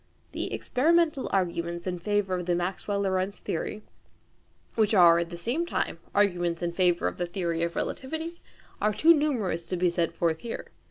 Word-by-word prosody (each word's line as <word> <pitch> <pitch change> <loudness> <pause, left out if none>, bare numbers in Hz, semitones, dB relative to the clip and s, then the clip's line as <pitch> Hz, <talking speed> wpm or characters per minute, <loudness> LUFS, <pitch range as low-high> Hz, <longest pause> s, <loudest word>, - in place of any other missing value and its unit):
The - - -4
experimental 315 +1 +2
arguments 170 -2 -1
in 180 -2 -3
favour 205 0 0
of 180 -1 -2
the 175 - +2
Maxwell 190 +3 -2
Lorentz 190 0 0
theory, 210 +5 -4 0.9
which 220 -1 +2
are 170 -3 +7
at 170 -1 -2
the 170 - -7
same 240 - -1
time 345 - -2 0.2
arguments 175 -4 +2
in 170 - 0
favour 175 -1 +2
of - - -4
the 175 - -1
theory 170 -2 -2
of 170 0 -1
relativity, 320 +5 -4 0.4
are 210 0 +2
too 330 +7 +7
numerous 230 - 0
to 180 - -2
be 175 0 +2
set 170 -1 0
forth 165 -2 0
here. 235 - -6
185 Hz, 175 wpm, -27 LUFS, 170-220 Hz, 0.9 s, are